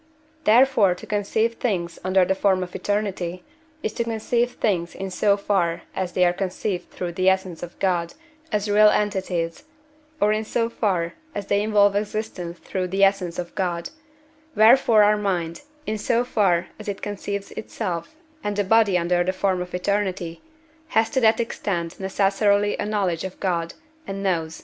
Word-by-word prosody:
Therefore 225 Hz, -5 st, +5 dB
to -, -, -11 dB
conceive 220 Hz, +2 st, 0 dB
things 175 Hz, -8 st, -2 dB
under 185 Hz, 0 st, +3 dB
the 190 Hz, -, +2 dB
form 190 Hz, -1 st, +2 dB
of 180 Hz, -, -8 dB
eternity, 185 Hz, -4 st, -2 dB, 0.4 s
is 215 Hz, -, -2 dB
to 235 Hz, -, -1 dB
conceive 235 Hz, +2 st, 0 dB
things 175 Hz, -5 st, -1 dB
in 190 Hz, 0 st, -5 dB
so 200 Hz, +2 st, +2 dB
far 185 Hz, -4 st, 0 dB
as 185 Hz, -2 st, -2 dB
they 180 Hz, -, +3 dB
are 175 Hz, -, +3 dB
conceived 185 Hz, 0 st, -3 dB
through 180 Hz, -1 st, -5 dB
the 185 Hz, +2 st, +2 dB
essence 190 Hz, -3 st, -1 dB
of 175 Hz, 0 st, -8 dB
God 175 Hz, -1 st, 0 dB, 0.4 s
as 210 Hz, -1 st, 0 dB
real 210 Hz, +1 st, +6 dB
entities, 190 Hz, -, -1 dB, 0.5 s
or 210 Hz, +1 st, +3 dB
in 215 Hz, +1 st, -1 dB
so 230 Hz, +1 st, -1 dB
far 180 Hz, -7 st, 0 dB, 0.2 s
as 200 Hz, -, -3 dB
they 200 Hz, -, +1 dB
involve 205 Hz, -1 st, +3 dB
existence 205 Hz, -4 st, -3 dB
through 185 Hz, +1 st, -3 dB
the 195 Hz, +2 st, +1 dB
essence 195 Hz, -3 st, +2 dB
of 175 Hz, -1 st, -5 dB
God; 175 Hz, -3 st, -2 dB, 0.6 s
wherefore 220 Hz, 0 st, +6 dB
our 210 Hz, +1 st, +4 dB
mind, 175 Hz, -5 st, -2 dB, 0.2 s
in 215 Hz, 0 st, -2 dB
so 235 Hz, +3 st, +1 dB
far 190 Hz, -7 st, +1 dB
as 215 Hz, -, -9 dB
it 200 Hz, -1 st, -4 dB
conceives 200 Hz, -1 st, -4 dB
itself 175 Hz, -, -5 dB, 0.3 s
and 205 Hz, 0 st, -2 dB
the 205 Hz, -, +1 dB
body 205 Hz, -2 st, +4 dB
under 175 Hz, 0 st, +1 dB
the 185 Hz, -, 0 dB
form 185 Hz, -1 st, 0 dB
of 180 Hz, 0 st, -5 dB
eternity, 185 Hz, -3 st, -2 dB, 0.5 s
has 225 Hz, -7 st, +1 dB
to 260 Hz, -, +1 dB
that 220 Hz, 0 st, +4 dB
extent 180 Hz, -7 st, -3 dB
necessarily 200 Hz, +1 st, +2 dB
a -, -, -2 dB
knowledge 190 Hz, -6 st, 0 dB
of 190 Hz, -1 st, -7 dB
God, 170 Hz, -3 st, -1 dB, 0.3 s
and 195 Hz, 0 st, -4 dB
knows, 165 Hz, -4 st, -1 dB
&c. -, -, -11 dB
195 Hz, 175 wpm, -23 LUFS, 180-210 Hz, 0.6 s, real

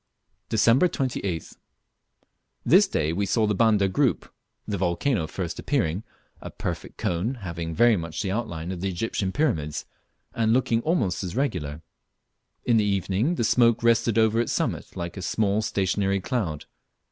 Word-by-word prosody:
Dec. 115 Hz, +3 st, +4 dB
28th. 100 Hz, -, -3 dB, 1.1 s
This -, -, +6 dB
day 80 Hz, +2 st, 0 dB
we 100 Hz, +3 st, -1 dB
saw 110 Hz, +2 st, +2 dB
the 105 Hz, -, +1 dB
Banda 105 Hz, -2 st, +3 dB
group, 95 Hz, -, 0 dB, 0.3 s
the 100 Hz, -3 st, -2 dB
volcano 90 Hz, -, 0 dB
first 85 Hz, 0 st, -5 dB
appearing, 100 Hz, -, 0 dB, 0.4 s
a -, -, -7 dB
perfect -, -, -6 dB
cone, 90 Hz, +10 st, -1 dB
having 85 Hz, -6 st, -5 dB
very 120 Hz, +4 st, +5 dB
much 85 Hz, -4 st, -5 dB
the 95 Hz, -, -2 dB
outline 90 Hz, -6 st, -3 dB
of 90 Hz, -2 st, -5 dB
the 95 Hz, -, -1 dB
Egyptian 95 Hz, +1 st, -2 dB
pyramids, 80 Hz, -, -1 dB, 0.5 s
and 110 Hz, -1 st, +2 dB
looking 115 Hz, -2 st, +2 dB
almost 115 Hz, -, 0 dB
as 90 Hz, +1 st, -5 dB
regular. 80 Hz, -, -2 dB, 0.8 s
In 120 Hz, -2 st, +4 dB
the 110 Hz, -, +3 dB
evening 100 Hz, -, 0 dB
the 115 Hz, -, -1 dB
smoke 115 Hz, 0 st, +3 dB
rested 115 Hz, -1 st, +3 dB
over 110 Hz, +1 st, +3 dB
its 120 Hz, -, -2 dB
summit -, -, -2 dB
like 85 Hz, +2 st, -5 dB
a -, -, -5 dB
small 100 Hz, +3 st, +1 dB
stationary 100 Hz, -1 st, 0 dB
cloud. 90 Hz, -, -3 dB
100 Hz, 155 wpm, -25 LUFS, 85-115 Hz, 1.1 s, This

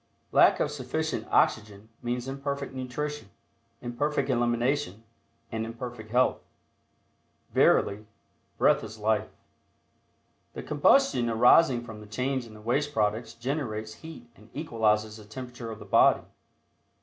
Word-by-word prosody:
Lack -, -, +5 dB
of -, -, 0 dB
sufficient -, -, -3 dB
oxygen 105 Hz, -1 st, +1 dB
means 120 Hz, +1 st, -3 dB
Imperfect 140 Hz, 0 st, -4 dB
nutrition, 130 Hz, 0 st, -5 dB, 0.5 s
Imperfect 135 Hz, +3 st, -1 dB
elimination 120 Hz, -1 st, 0 dB, 0.5 s
and 110 Hz, 0 st, -2 dB
imperfect 115 Hz, -1 st, -7 dB
health. 125 Hz, +3 st, +2 dB, 1.1 s
Verily, 105 Hz, +2 st, +3 dB, 0.5 s
"breath -, -, +3 dB
is 110 Hz, -, -8 dB
life." 110 Hz, 0 st, 0 dB, 1.3 s
The -, -, -6 dB
combustion 145 Hz, -, +3 dB
arising 125 Hz, +3 st, +5 dB
from 110 Hz, -3 st, -9 dB
the 105 Hz, -, -12 dB
change 130 Hz, +3 st, -2 dB
in 110 Hz, -, -13 dB
the 105 Hz, -, -13 dB
waste 145 Hz, +6 st, 0 dB
products 110 Hz, +2 st, 0 dB
generates 115 Hz, -4 st, -3 dB
heat 160 Hz, -7 st, -10 dB
and 105 Hz, +3 st, -19 dB
equalizes 110 Hz, -7 st, 0 dB
the 110 Hz, -, -12 dB
temperature 125 Hz, +2 st, -8 dB
of 110 Hz, -, -7 dB
the -, -, -11 dB
body. -, -, +4 dB
120 Hz, 125 wpm, -28 LUFS, 110-135 Hz, 1.3 s, Lack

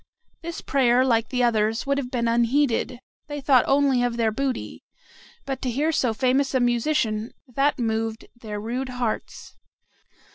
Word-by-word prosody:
This 335 Hz, -1 st, -6 dB
prayer, 255 Hz, -2 st, +3 dB
like 230 Hz, -3 st, +1 dB
the 250 Hz, -1 st, 0 dB
others, 225 Hz, -1 st, +1 dB
would 280 Hz, 0 st, +1 dB
have 250 Hz, -3 st, -4 dB
been 235 Hz, -2 st, -1 dB
unheeded, 240 Hz, +1 st, +1 dB, 0.3 s
they 290 Hz, -1 st, -5 dB
thought 265 Hz, -3 st, +4 dB
only 275 Hz, -2 st, +3 dB
of 245 Hz, -1 st, -1 dB
their 225 Hz, -2 st, +2 dB
booty, 265 Hz, +3 st, -3 dB, 0.6 s
but 270 Hz, -1 st, -4 dB
to 255 Hz, -, -1 dB
hear 290 Hz, +7 st, 0 dB
so 255 Hz, -6 st, +1 dB
famous 260 Hz, +4 st, +1 dB
a -, -, +4 dB
musician, 240 Hz, -2 st, 0 dB
that 275 Hz, +4 st, +1 dB
moved 225 Hz, -2 st, -2 dB
their 215 Hz, -3 st, -6 dB
rude 245 Hz, +5 st, -3 dB
hearts. 250 Hz, -3 st, -4 dB
245 Hz, 155 wpm, -24 LUFS, 230-275 Hz, 0.6 s, thought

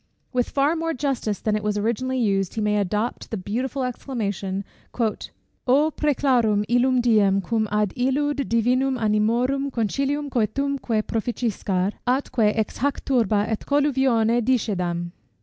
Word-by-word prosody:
With 250 Hz, -1 st, +1 dB
far 285 Hz, +4 st, +2 dB
more 330 Hz, 0 st, -2 dB
justice 255 Hz, -6 st, -2 dB
than 215 Hz, -1 st, 0 dB
it 215 Hz, -, -1 dB
was 210 Hz, 0 st, 0 dB
originally 240 Hz, +5 st, -1 dB
used, 195 Hz, -6 st, 0 dB
he 220 Hz, -, -1 dB
may 210 Hz, 0 st, +1 dB
adopt 210 Hz, +4 st, -2 dB
the 220 Hz, -, -3 dB
beautiful 250 Hz, +8 st, -3 dB
exclamation 205 Hz, -7 st, -3 dB, 0.4 s
"O 255 Hz, +5 st, -1 dB
præclarum 245 Hz, -8 st, +2 dB
illum 245 Hz, +1 st, +3 dB
diem, 210 Hz, -5 st, +3 dB
cum 220 Hz, +2 st, -1 dB
ad 210 Hz, -2 st, +1 dB
illud 270 Hz, +3 st, 0 dB
divinum 255 Hz, +3 st, +2 dB
animorum 235 Hz, +6 st, +1 dB
concilium 275 Hz, +5 st, -1 dB
coetumque 245 Hz, -1 st, 0 dB
proficiscar, 210 Hz, -4 st, -1 dB, 0.2 s
atque 250 Hz, -4 st, +2 dB
ex 220 Hz, -, -1 dB
hac 285 Hz, +2 st, -1 dB
turba 220 Hz, -6 st, +2 dB
et 220 Hz, -, -1 dB
colluvione 265 Hz, -5 st, +2 dB
discedam!" 180 Hz, -8 st, -1 dB
235 Hz, 130 wpm, -23 LUFS, 210-265 Hz, 0.4 s, illum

